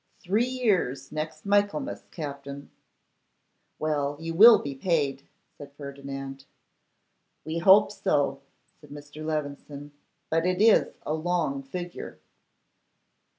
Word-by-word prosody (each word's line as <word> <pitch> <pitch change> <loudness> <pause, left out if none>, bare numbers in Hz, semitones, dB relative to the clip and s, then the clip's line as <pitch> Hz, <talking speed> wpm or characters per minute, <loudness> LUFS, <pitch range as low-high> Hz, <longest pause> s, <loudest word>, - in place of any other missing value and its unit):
three 215 +7 +1
years 215 - 0
next 155 +1 -5
Michaelmas, 205 +8 0
Captin.' 140 -2 -7 1.1
'Well, 145 -2 -1
you 165 0 -4
will 220 +6 +9
be 140 - -5
paid,' 140 -3 -1 0.3
said 140 -1 -12
Ferdinand. 140 -1 -8 1.0
'We 160 +2 -2
hope 190 +4 +6
so,' 145 -9 0 0.4
said 150 - -17
Mr. 145 +1 -10
Levison; 145 -1 -5 0.4
'but 165 +1 +2
it 180 0 0
is 220 +1 +4
a 150 - -1
long 160 -4 -1
figure. 175 +6 -7
155 Hz, 110 wpm, -27 LUFS, 140-180 Hz, 1.1 s, will